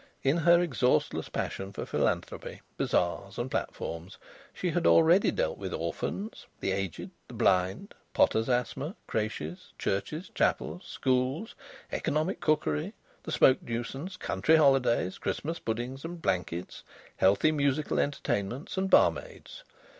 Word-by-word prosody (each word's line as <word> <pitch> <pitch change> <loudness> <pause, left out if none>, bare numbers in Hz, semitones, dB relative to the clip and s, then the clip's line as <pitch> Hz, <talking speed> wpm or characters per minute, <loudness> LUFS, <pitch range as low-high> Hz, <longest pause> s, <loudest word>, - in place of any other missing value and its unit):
In 135 +4 +3
her 170 +1 +5
exhaustless 130 -7 +1
passion 95 +1 -3
for - - -5
philanthropy, - - -2
bazaars, 95 +3 -1
and 125 +2 -3
platforms, 85 +3 -4 0.3
she 180 - -2
had 170 +1 +1
already 165 +4 +6
dealt - - -1
with - - -4
orphans, 215 +3 -4
the 95 - -1
aged, 95 -3 -3 0.2
the - - -10
blind, 90 +1 +1 0.2
potter's 110 +3 +3
asthma, 130 - -1
crèches, 105 -7 -4
churches, 125 - -2
chapels, 180 - 0
schools, 130 - 0 0.4
economic 155 +6 -1
cookery, 80 - 0 0.3
the - - -7
smoke 130 - +5
nuisance, 135 +10 -5
country 160 -2 +2
holidays, 135 - +3
Christmas 165 +3 -3
puddings 120 +4 -4
and 170 +1 -6
blankets, 90 - -2 0.3
healthy 100 +11 +4
musical 145 0 +1
entertainments, 130 - -2
and 190 0 0
barmaids. - - +2
135 Hz, 125 wpm, -29 LUFS, 100-165 Hz, 0.4 s, already